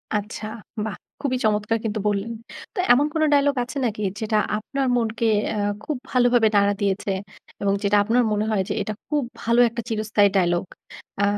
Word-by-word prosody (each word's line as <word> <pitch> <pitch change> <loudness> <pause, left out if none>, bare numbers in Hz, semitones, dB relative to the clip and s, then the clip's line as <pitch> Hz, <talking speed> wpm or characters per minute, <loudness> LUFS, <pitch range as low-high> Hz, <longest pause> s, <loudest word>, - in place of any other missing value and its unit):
আচ্ছা, 210 +1 -3 0.4
বাহ! 220 - -4 0.2
খুবই 265 -3 0
চমৎকার 215 +1 +1
কিন্তু 215 0 -1
বললেন। 205 +2 -1 0.4
তো - - -3
এমন 275 +4 +3
কোন 320 - 0
ডায়ালগ 285 0 +3
আছে 255 +4 -7
নাকি 215 -2 -2 0.2
যেটা 220 -1 0 0.2
আপনার 270 +5 -2
মনকে 230 -1 0 0.2
অ্যা 210 -2 -1 0.2
খুব 300 - -3
ভালোভাবে 245 -2 +4
নাড়া 200 0 +4
দিয়েছে? 200 0 0 0.5
এবং 200 -1 +2
যেটা 205 0 +3
আপনার 235 +4 +2
মনে 210 0 +1
হয় 205 -3 +2
যে - - 0
এটা 215 +1 -3
খুব 295 -2 0 0.2
ভালো 235 +1 +2
একটা 235 +1 -5
চিরস্থায়ী 215 -2 +2
ডায়ালগ? 175 -1 +2 0.6
আ - - +3
220 Hz, 175 wpm, -23 LUFS, 205-245 Hz, 0.6 s, ভালোভাবে